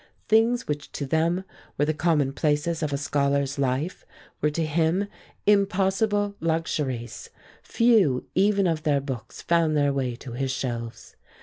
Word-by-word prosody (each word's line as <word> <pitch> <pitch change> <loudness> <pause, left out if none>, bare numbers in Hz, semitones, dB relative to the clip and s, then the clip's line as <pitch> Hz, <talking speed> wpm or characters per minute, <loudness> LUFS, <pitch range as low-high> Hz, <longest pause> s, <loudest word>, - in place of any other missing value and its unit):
Things 230 +3 +3
which 150 0 -4
to 140 - -3
them 165 +6 +1 0.3
were 145 - +2
the 155 - 0
commonplaces 150 0 +1
of 155 -2 -1
a 140 - 0
scholar's 140 -1 0
life 135 +6 -1 0.4
were 150 - +3
to 160 +2 -1
him 165 +5 +1 0.4
impossible 200 +1 +2
luxuries; 160 - -2 0.3
few 215 - +3
even 200 0 +3
of 165 -3 0
their 145 -2 +2
books 135 -5 -7
found 165 -3 +2
their 145 -1 +2
way 130 -3 -1
to 125 +1 -10
his 135 +3 -2
shelves. 120 -3 -5
155 Hz, 140 wpm, -25 LUFS, 140-185 Hz, 0.4 s, Things